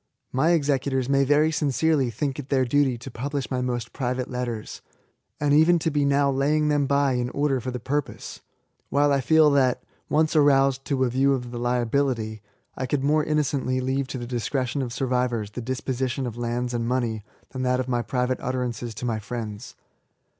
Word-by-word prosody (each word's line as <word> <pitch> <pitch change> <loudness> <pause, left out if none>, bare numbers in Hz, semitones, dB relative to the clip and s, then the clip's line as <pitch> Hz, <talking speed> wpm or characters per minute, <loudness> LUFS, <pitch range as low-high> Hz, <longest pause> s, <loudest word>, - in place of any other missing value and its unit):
My 145 +6 +2
executors 140 -4 +1
may 140 0 +3
very 145 +3 +3
sincereTy 150 -3 +1
think 135 +5 -3
it 140 - -7
their 130 -2 +2
duty 135 -1 +2
to 135 +3 -9
publish 140 +2 -4
my 130 -1 0
most 120 -2 -3
private 125 -1 -2
letters, 120 -3 -4 0.3
— - - -49
and 145 -1 +2
even 160 +4 +5
to 160 0 -1
be 145 -1 +1
now 140 0 +3
laying 150 +3 +1
them 145 -2 +2
by 140 0 +2
in 125 0 -1
order 140 -1 0
for 130 - -4
the 125 0 -4
purpose: 145 +4 -4 0.5
while 145 0 +3
I 140 - +2
feel 155 +2 +5
that, 130 -3 +2 0.3
once 155 +1 +2
aroused 135 -2 +4
to 135 -3 0
a 125 - +2
view 135 +3 +2
of 125 -2 -6
the 120 - -5
liability, 120 -2 0 0.3
I 130 - -3
could 135 +1 -1
more 150 +2 +3
innocently 140 -4 0
leave 130 +1 -1
to 130 - -5
the 120 - -5
discretion 125 +2 -2
of 125 -2 -3
survivors 125 -4 -1
the 120 - -6
disposition 130 +1 -2
of 120 -3 -5
lands 120 +1 -2
and 115 -1 -1
money 120 -4 -1 0.3
than 130 - -5
that 125 0 +1
of 130 - -2
my 120 -2 0
private 125 +1 -1
utter 130 0 -1
ances 120 -1 -6
to - - -5
my 115 -2 -1
friends. 110 0 -6
130 Hz, 195 wpm, -25 LUFS, 120-140 Hz, 0.5 s, even